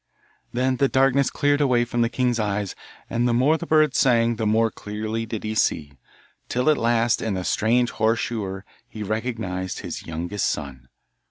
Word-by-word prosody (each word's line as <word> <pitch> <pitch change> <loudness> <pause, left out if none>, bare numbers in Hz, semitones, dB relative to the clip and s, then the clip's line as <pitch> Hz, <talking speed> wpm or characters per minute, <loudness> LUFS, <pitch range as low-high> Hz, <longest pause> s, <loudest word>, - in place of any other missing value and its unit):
Then 130 +1 0
the 140 - +3
darkness 135 0 +3
cleared 145 0 +1
away 125 -4 +3
from 120 0 -1
the 115 - +2
king's 125 -1 0
eyes, 105 -2 -1 0.3
and 120 +1 0
the 120 - +2
more 135 +6 +4
the 170 +1 -5
bird 155 -3 +4
sang 115 -4 +3
the 110 -1 -1
more 110 +1 +2
clearly 110 +3 -4
did 110 -1 -5
he 110 0 -2
see, 75 -8 0 0.6
till 125 +5 +2
at 150 - +1
last 115 0 +2
in 110 -3 -1
the 90 - -3
strange 120 +5 +1
horse 110 +1 +1
shoer 95 -4 -4 0.3
he 110 - -6
recognised 110 -4 -3
his - - -7
youngest 85 +5 -2
son. 65 -4 -6
115 Hz, 180 wpm, -23 LUFS, 105-125 Hz, 0.6 s, more